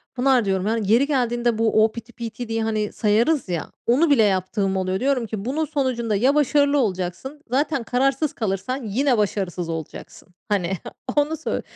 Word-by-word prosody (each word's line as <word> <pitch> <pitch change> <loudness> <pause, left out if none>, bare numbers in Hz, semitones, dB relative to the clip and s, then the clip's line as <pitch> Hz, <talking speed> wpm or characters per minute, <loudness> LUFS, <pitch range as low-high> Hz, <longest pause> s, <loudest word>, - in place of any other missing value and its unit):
Pınar 255 -2 +3
diyorum, 190 0 0
yani, 220 -2 0
yeri 250 +5 +4
geldiğinde 240 -4 0
bu 220 -1 +3
o 220 - -1
piti 235 +1 -10
piti 235 +1 -6
diye, 225 0 -1
hani, 215 -1 -1
sayarız 230 +4 +1
ya, 170 -3 -3
onu 280 +8 +3
bile 270 -6 +5
yaptığım 195 0 0
oluyor. 185 0 -1
Diyorum 265 -2 +1
ki 205 -1 -5
“Bunun 300 +6 -1
sonucunda 255 -7 -1
ya 255 +8 +3
başarılı 290 0 +3
olacaksın, 205 +5 -2
zaten 275 +1 0
kararsız 270 +5 0
kalırsan 220 +3 -3
yine 245 +4 +1
başarısız 185 -4 -1
olacaksın.“ 160 +1 -7 0.2
Hani, 195 -3 0 0.4
onu 295 +2 +1
söy 320 - -3
230 Hz, 170 wpm, -22 LUFS, 205-270 Hz, 0.4 s, bile